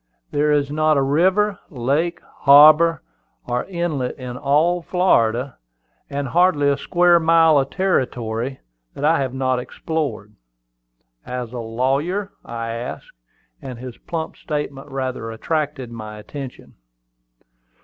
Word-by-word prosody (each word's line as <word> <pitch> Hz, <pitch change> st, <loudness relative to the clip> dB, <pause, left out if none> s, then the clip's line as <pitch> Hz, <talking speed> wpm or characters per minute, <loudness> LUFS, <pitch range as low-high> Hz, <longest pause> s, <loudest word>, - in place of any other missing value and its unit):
There 150 Hz, +1 st, +1 dB
is 145 Hz, -1 st, +1 dB
not 155 Hz, 0 st, +2 dB
a -, -, +3 dB
river, 185 Hz, +8 st, +2 dB
lake, 145 Hz, +6 st, -1 dB
harbor 155 Hz, +4 st, +6 dB, 0.4 s
or 125 Hz, 0 st, -1 dB
inlet 170 Hz, -8 st, -3 dB
in 125 Hz, -2 st, -7 dB
all 150 Hz, +6 st, +2 dB
Florida, 130 Hz, -9 st, +1 dB, 0.5 s
and 140 Hz, 0 st, -3 dB
hardly 160 Hz, -3 st, +3 dB
a 140 Hz, -, +2 dB
square 175 Hz, -1 st, +3 dB
mile 165 Hz, -2 st, +5 dB
of 135 Hz, 0 st, -1 dB
territory, 130 Hz, -, -1 dB, 0.3 s
that 145 Hz, -, -2 dB
I 160 Hz, +1 st, +3 dB
have 130 Hz, -1 st, -2 dB
not 130 Hz, -1 st, 0 dB
explored." 125 Hz, -7 st, -4 dB, 0.9 s
"As 125 Hz, -1 st, -5 dB
a 125 Hz, -, -4 dB
lawyer?" 135 Hz, -, -1 dB
I 115 Hz, -1 st, -5 dB
asked; 115 Hz, +2 st, -6 dB, 0.5 s
and 130 Hz, -3 st, -7 dB
his 125 Hz, 0 st, -9 dB
plump 160 Hz, -2 st, -5 dB
statement 145 Hz, -2 st, -5 dB
rather 130 Hz, -4 st, -4 dB
attracted 145 Hz, +1 st, -3 dB
my 110 Hz, -2 st, -8 dB
attention. 130 Hz, +4 st, -9 dB
140 Hz, 125 wpm, -21 LUFS, 125-160 Hz, 0.9 s, harbor